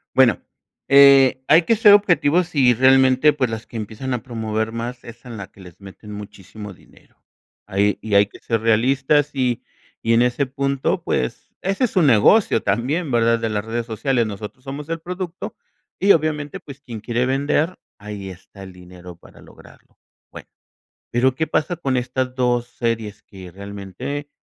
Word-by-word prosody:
Bueno, 130 -4 +4 0.5
eh, 135 -2 +6
hay 165 +3 +6
que 230 - +2
ser 210 -2 +6
objetivos 175 -4 +3
y 130 -5 +4
realmente, 130 +3 +4
pues 130 -4 -1
las 110 0 -6
que 115 - -9
empiezan 110 +5 -5
a 120 - -3
promover 110 -3 -3
más 120 +2 -6
es 120 +1 -13
en 120 -3 -8
la 100 -2 -7
que - - -22
les 90 0 -15
meten 100 +2 -12
muchísimo 105 0 -10
dinero. - - -23 0.5
Ahí 100 0 0
y 110 - -5
hay 100 0 +5
que - - -16
ser 115 -2 -2
realistas 135 +6 +2
y 125 -4 -1 0.4
y 115 - +3
en 115 - +4
ese 125 +3 +1
punto, 135 +1 -2
pues, 65 - -3
ese 195 +7 0
es 235 - -4
su 185 - +2
negocio 135 - +4
también, 135 - -1
¿verdad?, 115 -1 +2
de 115 - -2
las 105 -1 -2
redes 115 +1 -4
sociales, 120 +1 -1
nosotros 105 +4 -8
somos 140 +3 -7
el 165 0 -3
producto 180 +1 -6 0.4
y, 200 - +4
obviamente, 150 -3 0
pues, 140 -1 -12
quien 120 -5 -8
quiere 120 +3 -1
vender, 145 +6 0 0.2
ahí 100 -2 -7
está 95 +2 -13
el 95 -1 -11
dinero 90 -1 -13
para 85 - -19
lograrlo. - - -19 0.3
Bueno, - - -12 0.6
pero, 130 +2 +2
¿qué 160 +4 -1
pasa 160 +3 -1
con 135 -6 -1
estas 125 +1 -2
2 125 -2 0
series?, 115 -4 -4
que 95 -3 -12
realmente 100 +9 -7
125 Hz, 175 wpm, -21 LUFS, 105-140 Hz, 0.6 s, eh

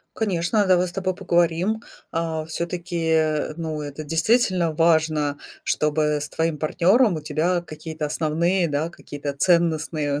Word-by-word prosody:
Конечно, 200 0 +1
давай 180 -1 +3
с 175 - -9
тобой 185 -1 -2
поговорим. 175 +3 +1 0.3
А, 160 -2 -2
всё-таки, 160 -2 -1
ну, 160 -2 -4
это 145 +1 -6
действительно 175 +2 +2
важно, 155 -3 +2 0.3
чтобы 150 0 +1
с - - -4
твоим 160 -1 -1
партнёром 185 - +3
у - - -4
тебя 160 +4 0
какие-то 155 -1 -6
основные, 170 +4 +1
да, 150 +3 -1
какие-то 145 -4 -6
ценностные 155 -3 +1
165 Hz, 130 wpm, -23 LUFS, 155-175 Hz, 0.3 s, давай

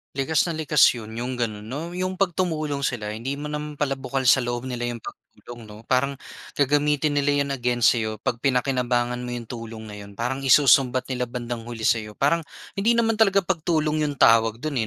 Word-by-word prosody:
Likas 145 +4 +1
na 170 - -3
likas 150 -4 +4
'yon, 110 -3 -8
'yong 125 +2 -3
gano'n 110 -4 -3
'no? 145 +8 -5
'Yong 185 +1 -3
'pag 195 0 +1
tumulong 155 -6 -1
sila 105 -5 -3
hindi 115 +6 -4
mo 150 +1 -6
naman 150 0 -5
pala 140 -2 -1
bukal 135 0 -3
sa - - +6
loob 120 -1 -2
nila 125 -2 -4
'yong 120 -2 -5
pagtulong, 120 -2 -12
'no? 105 +1 -12
Parang 135 +2 +2 0.4
gagamitin 145 +1 +2
nila 145 0 +2
'yon 140 - -5
against 120 -3 +2
sa'yo 110 -1 -4
'pag 120 - -1
pinakinabangan 125 -2 0
mo 120 - -4
'yong 120 -2 -7
tulong 115 -2 -8
na 105 - -9
'yon. 100 0 -11
Parang 125 +5 -2
isusumbat 130 -2 +4
nila 125 -1 -1
bandang 120 -1 -6
huli 120 -2 -7
sa'yo. 110 -1 0
Parang 155 +7 +1 0.3
hindi 225 +4 +3
naman 225 -2 +1
talaga 200 -3 +4
pagtulong 155 -3 0
'yong 145 - -3
tawag 115 -2 +4
do'n 140 -8 -1
130 Hz, 200 wpm, -24 LUFS, 120-150 Hz, 0.4 s, sa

